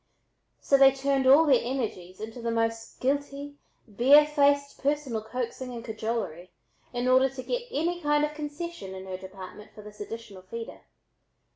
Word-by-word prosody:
So 275 - +3
they 270 0 +8
turned 270 0 0
all 285 +5 +8
their 270 -5 +4
energies 215 -8 -4
into 225 +3 -7
the 230 - -2
most 225 0 -2
guilty, 285 +1 -2 0.3
barefaced 285 +4 +4
personal 280 -5 -1
coaxing 245 +3 -5
and 230 0 -7
cajolery 220 -6 -4 0.4
in 245 0 -2
order 260 +1 +5
to 260 0 -8
get - - -3
any 345 0 -1
kind 295 -1 +3
of 300 - -5
concession 300 - -6
in 190 0 -8
her 185 -1 -5
department 190 +2 -10
for 210 - -11
this 210 0 -11
additional 205 -3 -8
feeder. 225 +5 -8
255 Hz, 155 wpm, -27 LUFS, 220-285 Hz, 0.4 s, they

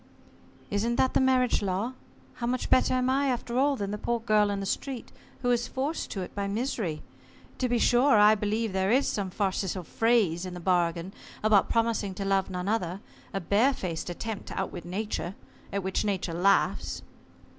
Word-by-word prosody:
"Isn't 225 +4 0
that 260 +2 +2
the - - +4
marriage 260 -2 +3
law? 200 +5 -1 0.4
How 235 - -2
much 250 +1 -2
better 255 - +4
am 255 0 +1
I 275 +2 +2
after 245 -1 -1
all 280 +1 +3
than 200 -5 -3
the 210 - -4
poor 235 +2 -1
girl 215 -2 +3
in 200 -1 -1
the 195 - -3
street, 255 +5 -4 0.3
who 245 - +2
is 240 0 +1
forced 280 +5 -3
to 195 - -4
it 180 - -7
by 200 -1 -2
misery? 205 - -2 0.6
To 255 - 0
be 245 - +2
sure, 245 +2 +4
I 210 +1 +7
believe 215 0 -1
there 190 0 +1
is 260 +5 +3
some 200 -3 -2
farcical 190 -1 -1
phrase 205 -3 +2
in 180 -1 -6
the - - -6
bargain 175 0 0 0.3
about 215 -2 +4
promising 225 -4 0
to 195 - -4
love 195 -1 +1
none 180 0 -4
other, 195 -4 -1 0.3
a 195 - -2
bare 215 +9 +2
faced 175 -5 -4
attempt 205 +4 -5
to - - -5
outwit 185 -2 -4
Nature, 195 0 -3 0.4
at 200 -1 -2
which 190 0 -1
Nature 190 -4 -1
laughs. 195 +4 +1
205 Hz, 190 wpm, -28 LUFS, 190-240 Hz, 0.6 s, I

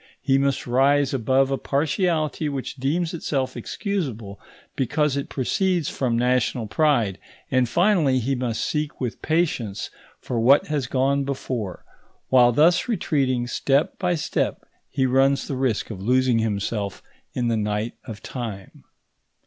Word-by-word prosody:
He 135 -1 +2
must 140 -1 0
rise 135 +3 +3
above 135 +2 +2
a 135 - 0
partiality 155 +1 0
which 140 -1 -5
deems 160 +6 -1
itself 135 -5 -2
excusable 120 - -4 0.4
because 145 +2 0
it 140 +1 -3
proceeds 175 +4 0
from 120 -3 -1
national 125 -1 +1
pride; 115 -5 +1 0.3
and, 130 -2 +2
finally, 170 - +3
he 130 +2 0
must 125 -3 -2
seek 150 -1 -2
with 125 -3 -4
patience 145 - -1 0.3
for 120 - -3
what 130 +5 +5
has 145 -5 -2
gone 135 +2 +1
before. 130 -7 -4 0.4
While 125 -2 +6
thus 160 - +3
retreating 135 - 0
step 135 +4 0
by 180 -2 +1
step 155 - -2 0.2
he 130 - 0
runs 135 +2 +2
the 140 - -3
risk 130 -4 -1
of 95 -3 -7
losing 125 +2 +2
himself 105 -2 -2 0.3
in 120 -1 0
the 115 - +1
night 105 +1 -2
of 110 -1 -9
time. 110 -7 -7
130 Hz, 140 wpm, -23 LUFS, 120-145 Hz, 0.4 s, While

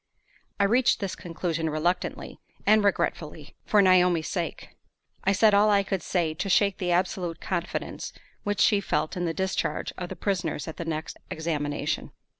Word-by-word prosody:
I - - +4
reached 235 +5 +3
this 195 -2 -3
conclusion 165 -1 -3
reluctantly 155 +4 -2 0.3
and 215 0 +5
regretfully, 155 -6 -1
for 210 -2 +5
Naomi's 180 -3 +4
sake. 170 -4 -4 0.6
I 195 - +4
said 210 +2 +4
all 205 +1 +5
I 200 -1 +4
could 195 -2 -2
say 165 -2 0
to 195 +5 -3
shake 200 +1 +3
the 180 -1 0
absolute 175 -1 0
confidence 175 -2 -3 0.3
which 205 -1 -1
she 205 -3 +4
felt 155 -4 -1
in 175 -1 -1
the 165 - 0
discharge 190 0 -1
of 180 -1 -4
the 190 - -6
prisoners 170 -5 -2
at 160 - -7
the 170 - -4
next 160 -1 -4
examination. 150 -2 -2
180 Hz, 165 wpm, -27 LUFS, 160-200 Hz, 0.6 s, and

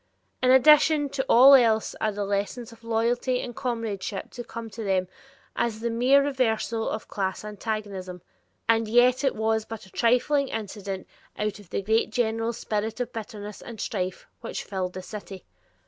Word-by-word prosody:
In 255 - +3
addition 295 +3 +6
to 265 0 -2
all 260 +4 +9
else 225 -4 +4
are 215 - +1
the 205 0 -3
lessons 205 +4 -2
of 230 0 -17
loyalty 235 +3 0
and 240 -2 -6
comradeship 225 -6 -3
to 240 - -7
come 230 -1 -7
to 220 +3 -6
them 190 -2 +1 0.5
as 225 -2 -1
the 235 +1 -2
mere 255 +5 +4
reversals 235 -4 0
of 220 - -5
class 195 0 -3
antagonism? 205 -4 -5 0.4
And 225 -1 +3
yet 245 +4 +4
it 270 - +1
was 220 0 +1
but 225 -1 -8
a 190 - -18
trifling 260 +4 +2
incident 200 -4 -5 0.3
out 210 0 -2
of 200 -4 -16
the - - -2 0.3
general 225 0 0
spirit 220 -1 -3
of 245 -1 -3
bitterness 210 -2 -7
and 230 -3 -9
strife 185 -3 -3
which - - -5
filled 185 -2 -3
the 185 - -7
city. 200 -3 -9
225 Hz, 165 wpm, -26 LUFS, 205-245 Hz, 0.5 s, all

